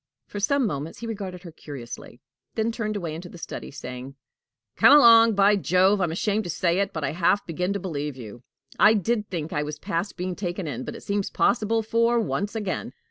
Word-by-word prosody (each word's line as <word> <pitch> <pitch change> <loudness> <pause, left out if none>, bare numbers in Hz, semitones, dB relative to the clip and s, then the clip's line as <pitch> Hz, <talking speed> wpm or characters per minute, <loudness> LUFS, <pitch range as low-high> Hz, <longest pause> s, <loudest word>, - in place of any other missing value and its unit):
For 205 - -7
some 275 +6 +2
moments 150 -5 -4
he 235 - -7
regarded 195 -5 -6
her 170 - -9
curiously, 125 -5 -9 0.3
then 225 +1 0
turned 215 -2 -3
away 170 -6 -3
into 175 +3 -8
the 175 - -11
study, - - -7
saying: 130 0 -8 0.6
"Come 290 - +8
along. 230 -4 +7
By 200 +1 +5
Jove! 190 +1 +3
I'm 175 -3 0
ashamed 210 +5 0
to - - -5
say 170 +2 +1
it, 200 0 0
but 160 -4 -5
I - - 0
half 175 +4 +1
begin 180 +3 -2
to 200 - -2
believe 150 -6 -4
in 130 - -10
you. 115 +3 -11 0.4
I 215 +1 +7
did 210 +1 -1
think 165 -3 -4
I 150 - 0
was 150 0 -5
past 170 +6 -3
being 180 0 -3
taken 180 -1 -4
in, 130 -4 -5
but - - -6
it - - -10
seems 200 -1 -1
possible 225 -1 +1
for 230 +2 +2
once 205 -1 -2
again. 200 -6 -3
185 Hz, 215 wpm, -25 LUFS, 160-215 Hz, 0.6 s, Come